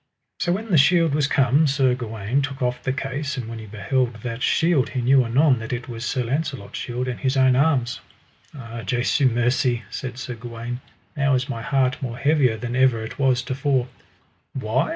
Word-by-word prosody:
So 175 - 0
when 215 +3 -4
the 165 - +6
shield 165 +1 +4
was 145 -1 +2
come, 140 +3 +3
Sir 135 -2 +2
Gawaine 115 +1 -2
took 140 -1 -4
off 125 -1 -1
the 130 - -1
case, 140 +2 -3
and 120 -3 -4
when 115 0 -6
he 110 - -9
beheld 115 +4 -1
that 120 0 -4
shield 160 -4 +2
he 130 - -2
knew 130 +2 +5
anon 130 +2 +3
that 115 - -6
it 120 -1 -4
was 120 -2 -6
Sir 125 +1 -1
Launcelot's 135 -3 -3
shield, 125 +1 -3
and 125 - -4
his 135 0 0
own 130 -1 +5
arms. 130 -4 +1 0.5
Ah 115 -3 -7
Jesu 125 +6 +1
mercy, 120 0 +1
said 125 -1 -5
Sir 125 -1 -5
Gawaine, 120 +1 -6 0.3
now 140 -2 +2
is 125 0 -1
my 115 - -4
heart 130 +1 0
more 120 -3 -4
heavier 135 -5 +2
than 120 +2 -4
ever 130 -3 +3
it 110 - -8
was 130 -2 +2
to 130 - -3
fore. 135 -2 0 0.6
Why? 130 0 0
130 Hz, 200 wpm, -23 LUFS, 120-140 Hz, 0.6 s, the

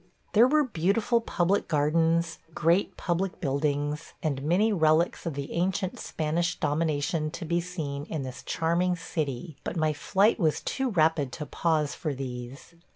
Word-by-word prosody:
There 230 +4 +7
were 300 +3 +4
beautiful 220 - +1
public 190 -2 +1
gardens, 165 +2 +2 0.2
great 170 +5 +2
public 180 +1 -1
buildings, 145 +1 -1
and 140 -4 -1
many 185 +9 +2
relics 160 0 +2
of 160 - -3
the 140 +1 -5
ancient 185 +2 -1
Spanish 170 +3 -1
domination 155 0 0
to 170 +3 -6
be 170 +2 +1
seen 150 -5 -5
in 155 -3 -4
this 130 -1 -7
charming 170 +2 +1
city, 155 -3 -4
but - - -4
my 155 -1 +2
flight 200 +9 +2
was 160 -5 +1
too 265 -1 -1
rapid 160 - +2
to 150 - -5
pause 155 -2 0
for 150 -4 -3
these. 130 +3 -7
165 Hz, 155 wpm, -28 LUFS, 150-180 Hz, 0.2 s, There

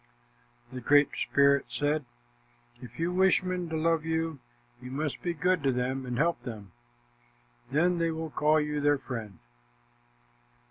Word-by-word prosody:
The 125 - -6
Great 145 +4 +5
Spirit 140 0 +3
said, 150 0 -1 0.8
"If 120 -2 -11
you 170 +2 -1
wish 190 0 +4
men 180 -2 -3
to 160 - -2
love 165 0 +1
you, 160 -2 -2 0.4
you 125 - -8
must 145 +2 -3
be 175 - -1
good 180 +1 +1
to 135 -1 +2
them 130 +1 -2
and 125 -1 -3
help 165 -1 +1
them. 110 -6 -8 1.0
Then 170 +6 +2
they 165 0 +1
will 160 -1 -4
call 155 +1 +3
you 150 0 -2
their 145 0 +3
friend." 115 -8 -7
150 Hz, 150 wpm, -29 LUFS, 130-165 Hz, 1.0 s, Great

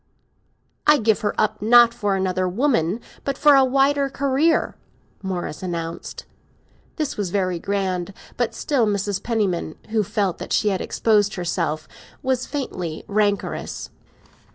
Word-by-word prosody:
"I 300 0 +7
give 220 -3 +2
her 205 - -1
up, 215 - 0
not 235 +2 +6
for 205 -4 0
another 185 -1 0
woman, 220 - +1 0.2
but 275 -1 -2
for 295 -1 +6
a 270 - +6
wider 275 +2 +2
career!" 280 +4 +1 0.5
Morris 180 -5 -4
announced. 170 -2 -5 0.7
This 305 -4 -3
was 200 -3 -1
very 185 -2 0
grand; 190 -1 -2 0.2
but 240 -2 -1
still 260 -7 +1
Mrs. 200 -1 -1
Penniman, 200 -9 -1
who 220 0 +2
felt 195 -2 -1
that - - -4
she 210 - +3
had 190 -2 -1
exposed 210 -2 +2
herself, 170 -3 -2 0.4
was 260 -1 0
faintly 180 - -4
rancorous. 205 -1 -1
205 Hz, 135 wpm, -22 LUFS, 185-255 Hz, 0.7 s, I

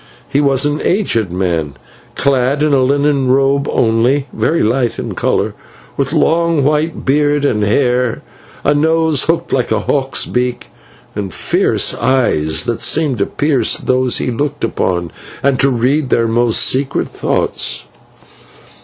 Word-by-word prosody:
He 140 - +1
was 140 -1 +2
an 145 0 -1
aged 115 - 0
man, 85 -6 -2 0.4
clad 140 +1 +1
in 150 -1 +2
a 135 - +3
linen 140 0 +1
robe 140 +2 +2
only, 120 +5 +1
very 165 - 0
light 120 +1 0
in - - -5
colour, - - -1 0.4
with - - -1
long 165 -2 +2
white 155 +3 -1
beard 145 +1 +1
and 105 -6 0
hair, 125 +2 0 0.4
a 145 - +3
nose 160 -1 +1
hooked 165 +1 -1
like 125 -4 0
a 110 - +1
hawk's 135 -2 0
beak, 125 0 -3 0.5
and 100 -2 -4
fierce - - 0
eyes 115 -12 +1
that 115 - -3
seemed 145 -8 +1
to 100 - 0
pierce 145 -2 +1
those 130 -1 +1
he - - -2
looked 145 +4 -3
upon 85 -2 -1 0.3
and 135 -2 +1
to 135 - +4
read 130 +3 0
their 115 -2 +2
most 115 0 +2
secret 135 +1 0
thoughts. - - -2
135 Hz, 145 wpm, -15 LUFS, 115-145 Hz, 0.5 s, to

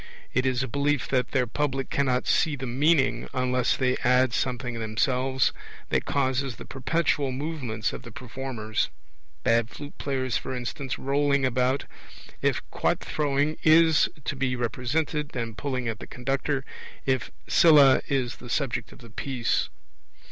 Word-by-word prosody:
It 125 +2 +2
is 130 0 +1
a - - -2
belief 140 +1 0
that 125 -2 +1
their 130 -2 +1
public 135 +2 -2
cannot 130 -3 +1
see 155 -3 +2
the 135 -1 -5
meaning, 140 +4 +2
unless 125 -1 +1
they 130 -1 +1
add 125 0 +3
something 125 -2 -2
themselves, 125 +4 +1 0.4
that - - +1
causes 130 -2 0
the - - -10
perpetual 140 0 0
movements 130 -6 -3
of - - -6
the - - -11
performers 125 -4 -3 0.5
bad 115 0 +3
flute 145 +2 -9
players, 130 -3 -1
for 130 - -5
instance, 125 +1 -4
rolling 140 0 +1
about, 130 +2 +1 0.6
if - - 0
quoit - - +1
throwing 145 +1 0
is 160 0 +5 0.2
to - - -1
be 130 -1 0
represented, 145 +5 -2
and 115 -3 -3
pulling 130 0 -3
at 110 -1 -3
the - - -8
conductor, 135 +2 -2 0.4
if 130 -3 0 0.2
Scylla 150 -6 +7
is 130 -3 -1
the 120 - -11
subject 135 0 -1
of - - -15
the 115 -2 -13
piece. 125 -1 -1
130 Hz, 150 wpm, -26 LUFS, 125-140 Hz, 0.6 s, Scylla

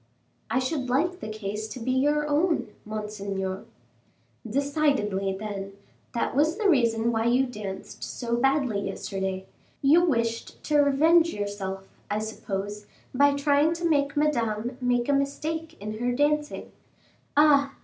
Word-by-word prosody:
"I - - +1
should 260 0 -1
like 345 +8 +1
the 215 - -6
case 215 0 -4
to 220 +4 -8
be 250 +2 -1
your 295 +3 +2
own, 315 +3 +1 0.2
monseigneur." 200 -3 -4 0.8
"Decidedly, 265 -8 0
then, 200 -2 -5 0.4
that 235 - -1
was 310 +4 +2
the 435 -2 +1
reason 235 -7 +3
why 225 0 0
you 250 +3 +3
danced 210 -6 -7
so 235 -1 -2
badly 255 -5 +1
yesterday; 190 -1 -3 0.4
you 315 +6 +6
wished 230 -8 -1
to 300 -1 +2
revenge 320 +4 +4
yourself, 195 -2 -4 0.2
I 205 - 0
suppose, 205 -1 -4 0.3
by 280 +2 +4
trying 285 +2 +3
to 340 0 -1
make 285 -2 +1
Madame 240 -5 0
make 245 -1 +1
a 285 - +3
mistake 310 +4 -2
in 215 +2 -5
her 245 +1 0
dancing; 295 +3 0 0.7
ah! 285 -2 +5
250 Hz, 140 wpm, -26 LUFS, 210-290 Hz, 0.8 s, you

